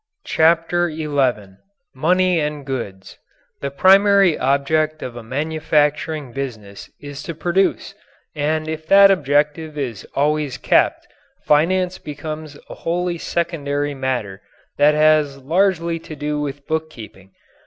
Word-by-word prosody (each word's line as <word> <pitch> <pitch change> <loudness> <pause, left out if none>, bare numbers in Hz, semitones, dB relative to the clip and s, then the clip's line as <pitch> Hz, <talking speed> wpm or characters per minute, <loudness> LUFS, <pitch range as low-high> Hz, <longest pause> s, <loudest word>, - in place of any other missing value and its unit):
CHAPTER 170 +2 +2
XI 130 -11 -1 0.4
MONEY 180 +5 +2
AND 150 -2 -3
GOODS 110 -8 -6 0.4
The 140 - -3
primary 195 +3 +5
object 155 +4 0
of 120 - -6
a 120 - -7
manufacturing 150 +2 -1
business 110 -7 -7
is 145 0 -8
to 165 - -6
produce, 175 +4 0 0.4
and 155 +1 -1
if 160 0 -5
that 195 +1 +7
objective 150 -1 0
is 120 -8 -4
always 145 -2 0
kept, - - +1 0.4
finance 180 +5 +2
becomes 155 0 -7
a - - -9
wholly 175 0 -2
secondary 145 -5 -2
matter 125 -8 -3 0.4
that 150 +1 +5
has 150 -2 +3
largely 170 +3 0
to 160 - -10
do 150 0 -3
with 140 -1 -5
bookkeeping. 115 - -6
150 Hz, 120 wpm, -20 LUFS, 140-165 Hz, 0.4 s, that